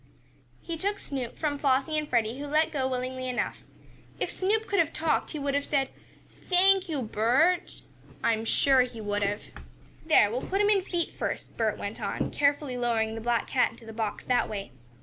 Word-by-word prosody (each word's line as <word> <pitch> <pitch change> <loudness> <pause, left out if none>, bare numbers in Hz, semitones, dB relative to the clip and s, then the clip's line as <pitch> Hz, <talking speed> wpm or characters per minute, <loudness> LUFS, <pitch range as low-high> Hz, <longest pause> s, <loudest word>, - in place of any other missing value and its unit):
He 335 -1 -4
took 405 +4 -1
Snoop 260 -4 -5
from 290 -2 -1
Flossie 275 +2 +2
and 305 -1 -1
Freddie, 235 +1 +1
who 290 - -5
let 310 +2 +2
go 270 -3 0
willingly 255 0 -3
enough. 250 - -2 0.6
If - - -1
Snoop 430 +4 +1
could 405 -2 0
have 320 - +3
talked 315 -1 0
he 310 - -5
would 280 -1 -1
have 285 0 +1
said, 275 -2 0 0.6
"Thank 375 0 +4
you, 290 -5 -1
Bert!" 255 - +1 0.4
I 230 - +4
am 220 0 -2
sure 265 +3 +4
he 250 -2 -3
would 205 -1 -2
have. 205 +1 -1 0.6
"There, 260 -10 +5
we'll 250 +3 -2
put 390 - -2
him 415 0 +4
in 400 -2 +4
feet 345 -3 -2
first," - - -4
Bert - - 0
went - - -5
on, - - -2
carefully 285 -2 +1
lowering 225 -2 +1
the 225 - -5
black 235 0 +1
cat 255 - +2
into 230 - -15
the 225 - -9
box 220 -1 -3
that 250 -1 +1
way. 200 -2 -5
270 Hz, 200 wpm, -28 LUFS, 235-320 Hz, 0.6 s, There